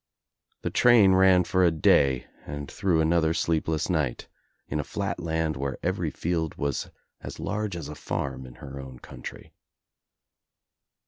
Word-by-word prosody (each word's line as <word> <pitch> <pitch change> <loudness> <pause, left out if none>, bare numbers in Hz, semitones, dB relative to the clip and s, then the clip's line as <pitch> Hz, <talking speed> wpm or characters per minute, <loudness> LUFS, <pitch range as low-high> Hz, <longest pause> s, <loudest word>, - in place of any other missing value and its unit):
The - - -2
train 115 -6 +6
ran 95 -1 +6
for 95 +1 +2
a 90 - +6
day 70 -5 +3 0.2
and 75 -1 -6
through 95 -6 +1
another 80 0 +2
sleepless 80 -1 0
night 75 -9 -1 0.4
in 75 - -2
a - - -1
flat 95 +2 -3
land 80 -2 -1
where 70 0 -3
every - - 0
field 80 -2 -2
was 70 -2 -2 0.3
as - - -8
large 105 -1 -2
as 85 -4 -5
a 75 - -6
farm 65 -2 -4
in 60 - -13
her 70 0 -9
own 65 -2 -9
country. - - -10
80 Hz, 150 wpm, -27 LUFS, 70-90 Hz, 0.4 s, train